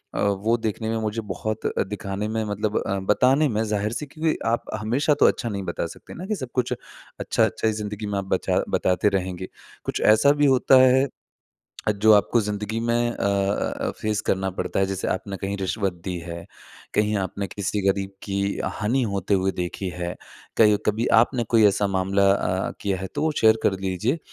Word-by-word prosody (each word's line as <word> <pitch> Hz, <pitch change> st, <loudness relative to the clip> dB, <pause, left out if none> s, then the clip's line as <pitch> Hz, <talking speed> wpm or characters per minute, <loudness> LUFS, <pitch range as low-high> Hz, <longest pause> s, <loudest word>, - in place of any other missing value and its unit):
अ, -, -, -2 dB
वो 100 Hz, +4 st, +1 dB
देखने 110 Hz, 0 st, -3 dB
में 115 Hz, -, 0 dB
मुझे 110 Hz, +1 st, -2 dB
बहुत 110 Hz, 0 st, -3 dB, 0.2 s
दिखाने 105 Hz, 0 st, -4 dB
में 110 Hz, 0 st, -1 dB
मतलब 105 Hz, +1 st, -1 dB
अ, 100 Hz, 0 st, -1 dB
बताने 130 Hz, +9 st, +3 dB
में 110 Hz, -1 st, 0 dB
ज़ाहिर 105 Hz, 0 st, -1 dB
से 150 Hz, +5 st, -4 dB
क्योंकि 155 Hz, +2 st, -1 dB
आप 115 Hz, +1 st, +1 dB, 0.2 s
हमेशा 135 Hz, +8 st, +1 dB
तो -, -, +6 dB
अच्छा 120 Hz, -, 0 dB
नहीं 100 Hz, -2 st, -3 dB
बता 85 Hz, -1 st, -3 dB
सकते -, -, -13 dB
ना 180 Hz, -, -7 dB
कि 215 Hz, -, -1 dB
सब 130 Hz, -9 st, -6 dB
कुछ 125 Hz, -1 st, 0 dB, 0.5 s
अच्छा-अच्छा -, -, +1 dB
ही 110 Hz, -, +2 dB
ज़िंदगी 105 Hz, 0 st, -5 dB
में 105 Hz, -1 st, -2 dB
आप 95 Hz, -, -4 dB
बचा 95 Hz, -, +1 dB
बताते 95 Hz, +3 st, +2 dB
रहेंगे 95 Hz, 0 st, -5 dB, 0.4 s
कुछ -, -, -2 dB
ऐसा 110 Hz, +7 st, +5 dB
भी -, -, +6 dB
होता 135 Hz, -1 st, +5 dB
है 130 Hz, +2 st, +5 dB, 0.8 s
अ, -, -, +5 dB
जो 105 Hz, +1 st, +4 dB
आपको 105 Hz, +3 st, +4 dB
ज़िंदगी 105 Hz, +1 st, -3 dB
में 120 Hz, +1 st, +1 dB
अ -, -, -5 dB
अ 100 Hz, 0 st, 0 dB
अ, -, -, -1 dB
फेस 110 Hz, -1 st, 0 dB
करना 95 Hz, 0 st, 0 dB
पड़ता 95 Hz, -, -2 dB
है 95 Hz, -, +3 dB
जैसे 95 Hz, -1 st, -3 dB
आपने 100 Hz, +1 st, -3 dB
कहीं 100 Hz, +1 st, -3 dB
रिश्वत 95 Hz, 0 st, -1 dB
दी 90 Hz, -2 st, -3 dB
है, 85 Hz, 0 st, -7 dB, 0.5 s
कहीं 105 Hz, 0 st, +2 dB
आपने 100 Hz, +1 st, -3 dB
किसी 100 Hz, +2 st, -3 dB
गरीब 95 Hz, 0 st, 0 dB
की 100 Hz, -1 st, -3 dB, 0.3 s
हानी 125 Hz, +5 st, 0 dB
होते 100 Hz, +1 st, 0 dB
हुए 95 Hz, 0 st, +2 dB
देखी 90 Hz, +2 st, -4 dB
है, 90 Hz, 0 st, -4 dB, 0.4 s
कहीं 105 Hz, -2 st, +6 dB
कभी 110 Hz, +3 st, +1 dB
आपने 120 Hz, 0 st, +1 dB
कोई 110 Hz, -, +6 dB
ऐसा 100 Hz, +1 st, +2 dB
मामला 95 Hz, +1 st, +2 dB
अ, 95 Hz, -1 st, -1 dB
किया 100 Hz, -2 st, -1 dB
है 95 Hz, -, -4 dB
तो -, -, -1 dB
वो 160 Hz, -, +2 dB
शेयर 110 Hz, 0 st, +5 dB
कर -, -, +3 dB
लीजिए 95 Hz, -, -1 dB
105 Hz, 200 wpm, -24 LUFS, 95-115 Hz, 0.8 s, तो